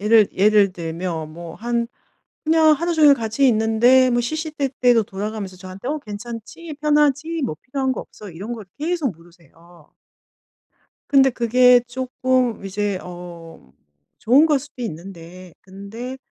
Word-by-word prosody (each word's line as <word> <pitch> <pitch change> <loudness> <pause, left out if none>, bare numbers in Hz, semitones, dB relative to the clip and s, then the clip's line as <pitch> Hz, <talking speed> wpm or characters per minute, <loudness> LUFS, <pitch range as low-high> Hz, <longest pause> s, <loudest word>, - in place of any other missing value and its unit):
예를 215 0 +4
예를 205 -1 +4
들면 165 -2 -5
뭐 170 0 -9
한 235 +1 -2 0.6
그냥 315 0 +5
하루 340 +3 0
종일 300 -3 +6
같이 235 +3 +1
있는데 240 +3 +4
뭐 240 0 +2
시시때때로 270 -4 0
돌아가면서 200 -1 -6
저한테 185 +6 -9
"어 305 +1 -1
괜찮지? 235 +7 -8
편하지? 300 +1 +1
뭐 155 -11 -4
필요한 265 0 -2
거 - - -5
없어?" 205 -3 -12
이런 200 +8 -7
걸 220 -5 -8
계속 315 - -1
물으세요. 170 -1 -21 1.2
근데 270 -1 +5
그게 245 +1 +4
쪼끔 255 -2 -1
이제 200 0 -2
어 170 - -11 0.5
좋은 270 +8 +4
걸 295 -3 +2
수도 270 -2 -10
있는데 180 -2 -9
근데 205 +7 -8
230 Hz, 275 characters per minute, -21 LUFS, 185-265 Hz, 1.2 s, 종일